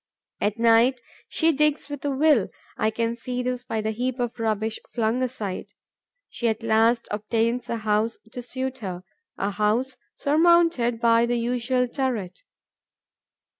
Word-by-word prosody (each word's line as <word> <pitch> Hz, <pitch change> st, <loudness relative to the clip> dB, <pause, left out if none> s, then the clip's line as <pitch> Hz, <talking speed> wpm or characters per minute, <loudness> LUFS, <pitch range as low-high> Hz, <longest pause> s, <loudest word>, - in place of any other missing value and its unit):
At 210 Hz, +1 st, 0 dB
night, 235 Hz, +2 st, +4 dB, 0.3 s
she 325 Hz, 0 st, +3 dB
digs 300 Hz, 0 st, +1 dB
with 290 Hz, -1 st, -7 dB
a 290 Hz, -, 0 dB
will. 275 Hz, -6 st, +3 dB, 0.3 s
I 215 Hz, -, +1 dB
can 230 Hz, +1 st, -1 dB
see 250 Hz, +1 st, -4 dB
this 250 Hz, 0 st, -2 dB
by 225 Hz, -3 st, -2 dB
the 220 Hz, +1 st, -1 dB
heap 250 Hz, +3 st, -2 dB
of 240 Hz, -1 st, -3 dB
rubbish 220 Hz, 0 st, -1 dB
flung 230 Hz, +1 st, 0 dB
aside. 230 Hz, -7 st, -4 dB, 0.5 s
She 240 Hz, -, -3 dB
at 220 Hz, 0 st, -1 dB
last 225 Hz, +1 st, +3 dB
obtains 230 Hz, +3 st, -1 dB
a 235 Hz, -, -1 dB
house 220 Hz, +1 st, 0 dB, 0.2 s
to 250 Hz, -, -5 dB
suit 260 Hz, +2 st, -4 dB
her, 185 Hz, -4 st, -5 dB, 0.3 s
a 200 Hz, -, -1 dB
house 220 Hz, +6 st, 0 dB, 0.2 s
surmounted 315 Hz, -6 st, +3 dB
by 230 Hz, 0 st, +4 dB
the 240 Hz, 0 st, 0 dB
usual 250 Hz, +1 st, 0 dB
turret. 240 Hz, -, -3 dB
235 Hz, 150 wpm, -25 LUFS, 220-255 Hz, 0.5 s, night